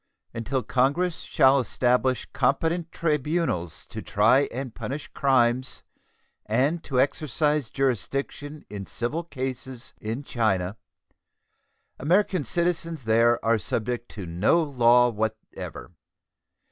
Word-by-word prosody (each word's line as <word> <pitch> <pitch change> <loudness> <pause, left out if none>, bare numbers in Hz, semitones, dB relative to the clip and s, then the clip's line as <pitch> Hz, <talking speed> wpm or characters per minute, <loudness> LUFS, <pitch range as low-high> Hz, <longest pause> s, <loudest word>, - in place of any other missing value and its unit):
Until 125 +3 -2
Congress 145 +10 +1
shall 135 +1 +4
establish 125 0 +1
competent 160 +6 0
tribunals 150 - -1
to - - -7
try 125 +7 +3
and 130 -1 -5
punish 140 +3 -5
crimes 130 -1 +1 0.6
and 135 +10 +1
to 130 -3 0
exercise 150 -1 +1
jurisdiction 135 - -2
in 100 -2 -7
civil 145 +9 -3
cases 130 -4 -6
in 115 +6 -4
China, 100 -7 0 1.2
American 180 +3 +2
citizens 165 +1 -1
there 115 +2 +4
are 115 0 +3
subject 120 +3 -3
to 100 -4 -7
no 95 - +2
law 125 -4 +4
whatever. 110 -1 -5
130 Hz, 105 wpm, -26 LUFS, 115-150 Hz, 1.2 s, shall